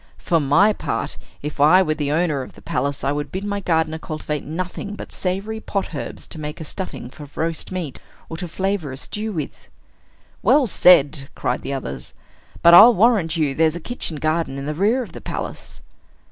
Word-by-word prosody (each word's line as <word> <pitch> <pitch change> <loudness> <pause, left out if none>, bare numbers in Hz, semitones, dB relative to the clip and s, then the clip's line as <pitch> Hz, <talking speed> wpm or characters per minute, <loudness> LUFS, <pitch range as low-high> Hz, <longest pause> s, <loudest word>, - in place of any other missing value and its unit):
"For 165 - +1
my 165 +9 +4
part, - - -3 0.3
if 150 0 -5
I 180 +6 +7
were 155 - 0
the 145 -2 -2
owner 155 -3 +1
of 130 - -9
the - - -16
palace, 140 +2 -2
I 135 - +1
would 145 0 -3
bid 190 +2 -4
my 205 0 -2
gardener 160 -4 0
cultivate 155 -2 -4
nothing 180 +5 -5
but - - -9
savory 195 +4 -2
pot 195 -5 -3
herbs 140 - -6
to 160 - -7
make 150 +2 -6
a - - -5
stuffing 160 -5 -6
for 145 0 -11
roast 165 +2 -3
meat, 175 -7 -4 0.3
or 160 - -6
to 180 - -4
flavor 190 -3 -2
a 130 - -7
stew 215 +9 -4
with." 160 -7 -6 0.7
"Well 290 -2 +4
said!" 145 - +4
cried - - -1
the 140 - -4
others. 70 - -6 0.5
"But 170 - +8
I'll 230 +7 +10
warrant 195 -6 +3
you 150 -4 +1
there's 160 +2 +2
a - - -4
kitchen 175 -5 -4
garden 155 -2 -1
in 140 - -5
the 150 - -2
rear 215 - +2
of - - -11
the - - -10
palace." - - -6
160 Hz, 200 wpm, -21 LUFS, 145-190 Hz, 0.7 s, I'll